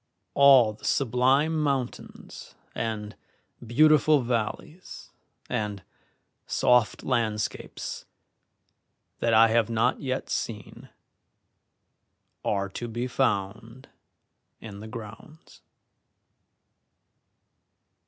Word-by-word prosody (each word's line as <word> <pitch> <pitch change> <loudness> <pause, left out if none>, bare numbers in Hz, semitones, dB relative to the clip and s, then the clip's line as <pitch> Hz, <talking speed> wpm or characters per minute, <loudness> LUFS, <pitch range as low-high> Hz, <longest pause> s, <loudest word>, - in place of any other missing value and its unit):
All 135 -5 +6
the 105 - -21
sublime 135 +5 +1
mountains 135 -4 -4 0.2
and 105 -2 -4 0.5
beautiful 150 +4 +4
valleys 125 +9 -5 0.4
and 105 -3 -3 0.6
soft 125 -3 +2
landscapes 110 -5 -3 1.1
that 115 -1 +2
I 115 +1 +6
have 115 0 +2
not 115 +3 0
yet 130 -1 -3
seen 105 -3 -5 1.5
are 100 -1 -1
to 120 +5 -6
be 120 +2 -4
found 115 0 -2 0.7
in 100 -2 -10
the 110 - -9
grounds. 115 +7 -12
120 Hz, 75 wpm, -26 LUFS, 110-135 Hz, 1.5 s, All